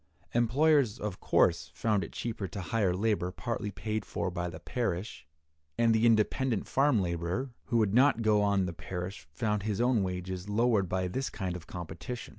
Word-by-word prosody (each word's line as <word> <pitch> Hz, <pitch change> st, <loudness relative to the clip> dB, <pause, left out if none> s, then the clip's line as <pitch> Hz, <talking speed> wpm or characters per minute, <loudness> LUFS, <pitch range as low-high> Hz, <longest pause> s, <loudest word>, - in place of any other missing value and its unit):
Employers, 130 Hz, +1 st, +3 dB
of 105 Hz, -3 st, -4 dB
course, 85 Hz, -2 st, +2 dB
found 105 Hz, +1 st, +1 dB
it 80 Hz, -, -7 dB
cheaper 110 Hz, -4 st, -4 dB
to 95 Hz, -, -7 dB
hire 95 Hz, 0 st, +1 dB
labor 100 Hz, -2 st, 0 dB
partly 110 Hz, +2 st, -3 dB
paid 110 Hz, +2 st, -3 dB
for 95 Hz, -, -3 dB
by 90 Hz, 0 st, -3 dB
the 85 Hz, -, -8 dB
parish, 95 Hz, -7 st, -3 dB, 0.5 s
and 115 Hz, -1 st, +4 dB
the 110 Hz, +1 st, +4 dB
independent 115 Hz, +1 st, +2 dB
farm 135 Hz, -4 st, +3 dB
laborer 85 Hz, +9 st, -2 dB
who 120 Hz, -, 0 dB
would 105 Hz, -3 st, +2 dB
not 125 Hz, -1 st, +4 dB
go 105 Hz, -1 st, +4 dB
on 100 Hz, -2 st, +2 dB
the 90 Hz, -, -4 dB
parish 90 Hz, 0 st, -6 dB
found 105 Hz, +6 st, -1 dB
his 105 Hz, -1 st, -2 dB
own 120 Hz, -2 st, +3 dB
wages 90 Hz, 0 st, -4 dB
lowered 105 Hz, -3 st, +2 dB
by 95 Hz, 0 st, 0 dB
this 130 Hz, +9 st, -2 dB
kind 95 Hz, -4 st, -4 dB
of 85 Hz, -2 st, -9 dB
competition. 90 Hz, +8 st, -6 dB
105 Hz, 180 wpm, -30 LUFS, 90-115 Hz, 0.5 s, and